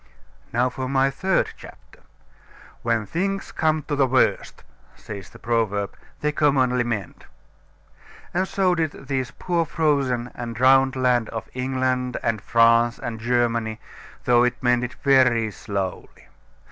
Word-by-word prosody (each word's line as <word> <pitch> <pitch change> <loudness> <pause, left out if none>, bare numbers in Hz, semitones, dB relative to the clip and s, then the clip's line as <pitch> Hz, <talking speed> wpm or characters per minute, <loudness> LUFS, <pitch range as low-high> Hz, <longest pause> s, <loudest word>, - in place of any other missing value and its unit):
Now 120 +2 +2
for 130 0 -4
my 135 0 +2
third 190 +7 0
chapter. - - -15 0.8
"When 115 -2 0
things 195 - -2
come 155 -1 0
to 145 0 -3
the 135 -2 +3
worst," 130 0 +1 0.3
says 100 -3 -9
the - - -14
proverb, 110 -4 -1 0.3
"they 150 - +1
commonly 130 -4 +2
mend;" 110 -6 -5 1.1
and 185 +2 0
so 190 -2 +1
did 160 -3 -1
this 135 -2 -3
poor 170 -2 0
frozen 140 -6 0
and 120 -1 -6
drowned 130 +2 +4
land 125 -3 +1
of 110 -1 -6
England 130 -1 -1
and 110 -3 0
France 115 +1 +4
and 115 -2 -5
Germany, 115 -1 0 0.5
though 120 -1 +5
it 125 0 +1
mended 125 0 +1
very 125 -5 +4
slowly. 100 -3 -5
125 Hz, 135 wpm, -23 LUFS, 115-135 Hz, 1.1 s, though